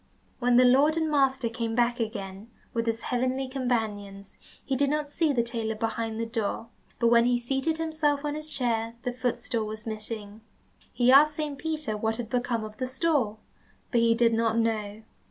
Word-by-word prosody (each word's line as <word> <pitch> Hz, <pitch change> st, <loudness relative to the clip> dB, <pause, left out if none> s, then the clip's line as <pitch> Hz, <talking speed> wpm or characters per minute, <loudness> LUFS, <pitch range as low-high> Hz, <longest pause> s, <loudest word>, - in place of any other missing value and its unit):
When 245 Hz, -1 st, +3 dB
the 250 Hz, -, +7 dB
Lord 280 Hz, +6 st, +5 dB
and 320 Hz, -1 st, 0 dB
master 270 Hz, -4 st, +2 dB
came 230 Hz, 0 st, -3 dB
back 240 Hz, +1 st, +2 dB
again 205 Hz, -2 st, -5 dB, 0.2 s
with 230 Hz, 0 st, -1 dB
his 225 Hz, 0 st, -1 dB
heavenly 255 Hz, +1 st, -1 dB
companions, 215 Hz, -7 st, -3 dB, 0.3 s
he 270 Hz, -, 0 dB
did 280 Hz, +1 st, +2 dB
not 295 Hz, 0 st, -1 dB
see 315 Hz, 0 st, +1 dB
the 240 Hz, -4 st, +1 dB
tailor 230 Hz, -2 st, -3 dB
behind 225 Hz, 0 st, -3 dB
the 230 Hz, -, -1 dB
door, 225 Hz, 0 st, -3 dB, 0.3 s
but 235 Hz, -, +4 dB
when 235 Hz, 0 st, +5 dB
he 245 Hz, 0 st, +3 dB
seated 270 Hz, +6 st, -1 dB
himself 310 Hz, -3 st, 0 dB
on 295 Hz, -, -1 dB
his 305 Hz, +1 st, -6 dB
chair 230 Hz, -4 st, -1 dB
the 250 Hz, -2 st, -2 dB
footstool 245 Hz, -2 st, -2 dB
was 215 Hz, 0 st, -7 dB
missing. 215 Hz, -1 st, -6 dB, 0.5 s
He 245 Hz, +1 st, +3 dB
asked 295 Hz, +3 st, +7 dB
Saint 295 Hz, -3 st, -4 dB
Peter 310 Hz, -8 st, -2 dB
what 220 Hz, +1 st, -1 dB
had 230 Hz, -2 st, -6 dB
become 245 Hz, -2 st, 0 dB
of 215 Hz, 0 st, -8 dB
the 255 Hz, -, -2 dB
stool, 260 Hz, -6 st, 0 dB, 0.5 s
but 235 Hz, -, +3 dB
he 230 Hz, 0 st, +4 dB
did 230 Hz, 0 st, +3 dB
not 225 Hz, 0 st, +1 dB
know. 220 Hz, -2 st, -1 dB
235 Hz, 190 wpm, -27 LUFS, 225-270 Hz, 0.5 s, the